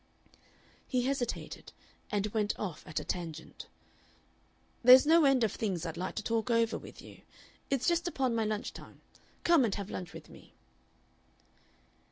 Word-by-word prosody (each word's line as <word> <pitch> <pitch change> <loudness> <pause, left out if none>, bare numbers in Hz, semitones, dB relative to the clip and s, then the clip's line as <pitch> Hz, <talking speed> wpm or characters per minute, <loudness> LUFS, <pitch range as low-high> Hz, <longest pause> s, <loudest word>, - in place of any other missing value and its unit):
He 250 -2 0
hesitated, 260 -2 -3 0.4
and 205 -2 0
went 210 -2 0
off 185 -7 -5
at 155 - -2
a - - -6
tangent. 165 -3 -6 1.2
"There's 255 +3 +9
no 320 0 +5
end 270 -3 +4
of 220 - +2
things 185 -7 -3
I'd 165 -1 -4
like 180 +2 -4
to 215 - -3
talk 230 +2 -1
over 230 -1 +2
with - - -10
you. - - -14 0.5
It's 270 -2 0
just 345 0 +2
upon 265 -7 0
my 225 -1 +1
lunch 215 0 -3
time. - - -13 0.4
Come 340 -5 +5
and 220 -5 0
have 200 -1 -6
lunch 180 -2 -6
with - - -11
me." - - -16
230 Hz, 160 wpm, -31 LUFS, 200-260 Hz, 1.2 s, There's